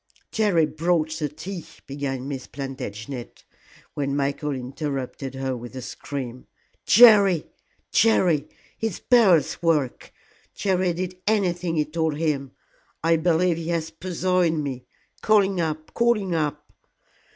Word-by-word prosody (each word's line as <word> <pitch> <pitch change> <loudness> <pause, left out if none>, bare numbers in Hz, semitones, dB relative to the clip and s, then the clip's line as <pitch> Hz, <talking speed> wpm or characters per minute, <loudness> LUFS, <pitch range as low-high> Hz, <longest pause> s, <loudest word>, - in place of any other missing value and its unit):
"Jerry 200 -7 +3
brought 160 +1 0
the 150 -2 -1
tea," 165 +4 -7 0.2
began 135 -2 -4
Miss 135 -3 -5
Plantagenet, 130 -2 -7 0.5
when 140 -1 -2
Michael 140 +1 -1
interrupted 135 0 -5
her 135 -1 -2
with 120 +1 -9
a 130 - -5
scream. 130 -2 -6 0.4
"Jerry! 200 -7 +7 0.5
Jerry! 175 -9 +3 0.3
It's 225 -5 -2
Beryl's 190 - +4
work. 155 -7 0 0.4
Jerry 185 -2 +1
did 180 +1 -5
anything 180 -5 +1
he 155 -1 +2
told 160 -1 -1
him. 150 -4 -1 0.5
I 165 0 +4
believe 170 +1 +2
he 165 0 -5
has 165 -2 -1
poisoned 175 -2 0
me. 130 -3 -5 0.4
Call 215 -2 +5
him 190 -1 -2
up 155 -1 -3
call 235 -1 +3
him 190 -4 -3
up." 150 -2 -2
160 Hz, 130 wpm, -24 LUFS, 140-180 Hz, 0.5 s, Jerry